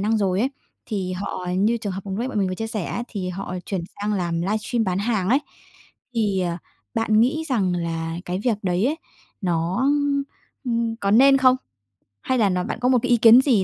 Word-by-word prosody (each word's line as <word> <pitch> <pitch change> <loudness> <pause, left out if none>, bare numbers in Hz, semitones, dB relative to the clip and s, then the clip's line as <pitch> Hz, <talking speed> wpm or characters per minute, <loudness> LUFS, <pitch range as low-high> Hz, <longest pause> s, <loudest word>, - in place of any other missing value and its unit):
năng 220 +3 +1
rồi 190 -2 +1
ấy, 260 +4 +1 0.4
thì 190 -4 -3
họ 185 -1 -4
như 215 +4 +3
trường 210 -4 -4
hợp 190 - -4
vừa 195 - -5
nãy 245 +3 -1
bọn 220 - -2
mình 195 -2 +1
vừa 185 - -2
chia 225 +4 -4
sẻ 215 -4 -3
á, 240 - -3
thì 190 -4 -4
họ 180 0 -5
chuyển 190 -3 -2 0.2
sang 210 +1 -1
làm 170 -4 -1
livestream 215 +5 -1
bán 185 -2 0
hàng 205 -3 0
ấy, 260 - +5 0.8
thì, 205 -4 +1
ờ, 175 -2 -1 0.4
bạn 220 -1 +3
nghĩ 310 +7 +2
rằng 205 -9 +1
là 165 -1 -3
cái 180 +1 -2
việc 225 -5 +1
đấy 185 +4 +1
ấy, 300 - 0 0.4
nó, 180 +7 0 0.8
ưm, 230 -2 -1
có 200 -3 -1
nên 270 +6 +7
không? 255 -1 +5 0.7
Hay 260 - 0
là 215 -4 +3
nó 180 -1 0
bạn 220 - -4
có 250 - +3
một 255 -1 +4
cái 250 - -1
ý 240 - +5
kiến 230 +2 +8
gì 245 -8 +3
205 Hz, 220 wpm, -23 LUFS, 185-235 Hz, 0.8 s, kiến